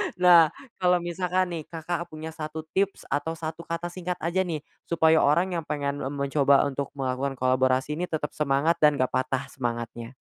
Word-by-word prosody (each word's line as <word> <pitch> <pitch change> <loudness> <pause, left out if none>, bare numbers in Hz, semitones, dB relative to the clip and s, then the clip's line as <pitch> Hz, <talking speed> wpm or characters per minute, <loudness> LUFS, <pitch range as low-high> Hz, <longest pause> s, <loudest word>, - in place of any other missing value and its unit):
Nah, 175 -2 +7 0.3
kalau 180 -1 +3
misalkan 180 +1 -1
nih, 165 -2 -4
Kakak 170 +1 -4
punya 155 -1 -7
satu 155 0 -6
tips 195 +1 +1
atau 160 +3 -1
satu 160 +1 -6
kata 170 +1 -3
singkat 180 0 -3
aja 180 +3 0
nih, 160 -4 -3 0.3
supaya 160 -1 +4
orang 175 +5 +2
yang - - -6
pengen 145 -1 -2
m 135 - -3
mencoba 140 0 +3
untuk 140 0 -3
melakukan 135 0 -2
kolaborasi 130 +3 +1
ini 180 - 0
tetap 155 -3 -2
semangat 150 +3 +1
dan 150 -1 +5
gak 130 - +2
patah 130 +1 -1
semangatnya? 120 -1 -4
155 Hz, 175 wpm, -26 LUFS, 140-170 Hz, 0.3 s, Nah